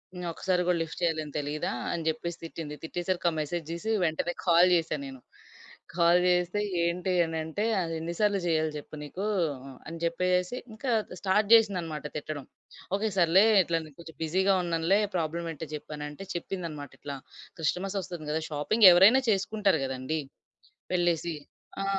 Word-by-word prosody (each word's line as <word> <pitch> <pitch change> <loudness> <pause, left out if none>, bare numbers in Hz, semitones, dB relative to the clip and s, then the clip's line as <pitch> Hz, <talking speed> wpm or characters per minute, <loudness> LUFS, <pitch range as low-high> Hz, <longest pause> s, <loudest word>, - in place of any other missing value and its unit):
హ్మ్. 180 0 -5
ఒకసారి 180 +1 0
గూడా 180 - +3
లిఫ్ట్ 165 - -8
చేయాలని 155 -3 -1
తెలీదా" 145 +1 -2 0.2
అని 170 -1 -2
జెప్పేసి 160 +2 -2
తిట్టింది. 160 -2 -6
తిట్టేసరికి 175 +2 -2
ఆ - - -6
మెసేజ్ 165 +3 -3
జూసి 170 +7 -3
వెంటనే 165 +2 -1
కాల్ 175 +1 +6
జేసా 165 -2 0
నేను. 130 -2 -9 0.7
కాల్ 170 0 +5
జేస్తే 180 +2 +2 0.2
"ఏంటె?" 180 +2 0
అనంటే 160 +4 -3 0.2
"అదెన్ని 165 0 -3
సార్లు 205 -2 +2
జేయాలి 160 -2 +1
జెప్పు 150 +1 -9
నీకు?" 185 +7 -5 0.6
అని 165 - -6
జెప్పేసేసి 180 +5 0 0.2
ఇంకా 245 +3 -3 0.3
స్టార్ట్ 205 +2 +2
జేసిందనమాట 180 -10 +3
తిట్టడం 150 -2 -5 0.5
"ఓకే. 215 +1 0
సర్లే 180 +4 +6 0.2
ఇట్లా 165 -1 0
నేను 150 -3 -15
కొంచెం 160 -3 -12
బిజీగా 190 +5 +2
ఉన్నానులే 170 +3 +2 0.2
ప్రాబ్లమ్ 165 +1 -2
ఏంటో 160 +1 -7
జెప్పు" 150 +1 -8
అనంటే 150 +5 -7
చెప్పిందనమాట. 165 -5 -5
ఇట్లా 140 -1 -5 0.4
క్రిస్టమస్ 185 +5 -1
ఒస్తుంది 165 -5 -7
గదా! 160 - 0
షాపింగ్ 185 +9 +5
ఎవరైనా 205 +9 +7
చేసుకుంటారు 200 -3 +1
గదండి. 130 +4 -3 0.7
వెళ్ళేసి! 170 -2 +1 0.5
ఆ! - - -2
170 Hz, 145 wpm, -28 LUFS, 155-185 Hz, 0.7 s, ఎవరైనా